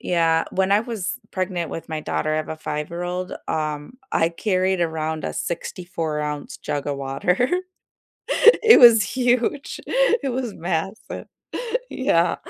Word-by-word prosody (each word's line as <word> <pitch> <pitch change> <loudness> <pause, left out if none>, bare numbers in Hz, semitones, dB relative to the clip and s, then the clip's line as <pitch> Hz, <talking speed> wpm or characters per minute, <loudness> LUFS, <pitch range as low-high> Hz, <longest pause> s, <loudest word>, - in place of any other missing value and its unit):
Yeah, 165 -2 +2
when 190 0 0
I 200 +1 +5
was 220 -5 -3 0.2
pregnant 185 -3 -2
with 165 - -7
my 155 -1 -3
daughter- 155 0 -1
I - - +1
have 155 - -2
a 160 - -4
five-year-old- 175 +4 -4 0.2
um, 155 +7 -3 0.2
I 165 - +3
carried 185 +1 0
around 160 -1 -2
a - - -2
sixty-four-ounce 160 -4 -4
jug 145 -1 -3
of 145 -1 -1
water. 175 - 0 1.2
It 455 0 +9
was 235 -3 +9
huge. 250 +3 0
It 475 - +2
was 245 -3 -3
massive. 175 +4 -4 0.6
Yeah. 170 -10 +2
175 Hz, 135 wpm, -23 LUFS, 155-215 Hz, 1.2 s, It